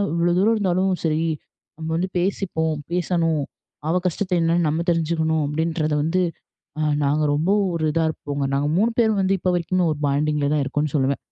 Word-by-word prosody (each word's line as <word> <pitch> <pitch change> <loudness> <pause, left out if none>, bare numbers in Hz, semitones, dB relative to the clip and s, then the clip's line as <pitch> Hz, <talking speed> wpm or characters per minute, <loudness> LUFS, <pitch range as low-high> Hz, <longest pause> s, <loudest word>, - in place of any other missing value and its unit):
இவ்ளோ 170 +1 +2
தூரம் 220 +4 +3
இருந்தாலும், 190 -1 +1
"சரி 155 0 +1 0.6
நம்ம 160 0 -5
வந்து 185 +2 -1
பேசிப்போம், 175 -4 -1 0.2
பேசணும் 170 -3 +1 0.5
அவ 165 - +1
கஷ்டத்தை 180 +1 -1
என்னன்னு 165 0 +2
நம்ம 160 +3 -1
தெரிஞ்சுக்கணும்" 160 -1 0
அப்டின்றத 155 +1 -1
வந்து, 170 +4 +1 0.6
அ - - 0 0.2
நாங்க 150 +2 +1
ரொம்ப 155 +6 +1 0.2
ஒரு 160 -2 -1
இதா 165 0 +2
இருப்போங்க. 145 -2 -3
நாங்க 140 +1 +1
3 220 +5 +3
பேரும் 220 -3 +3
வந்து 190 0 +2
இப்ப 180 - +1
வரைக்குமே 180 +1 0
ஒரு 150 - -3
பாண்டிங்ல 145 0 +1
தான் 150 - +2
இருக்கோம்னு 145 +2 -1
சொல்லுவேன். 135 -1 +1
165 Hz, 170 wpm, -22 LUFS, 150-180 Hz, 0.6 s, தூரம்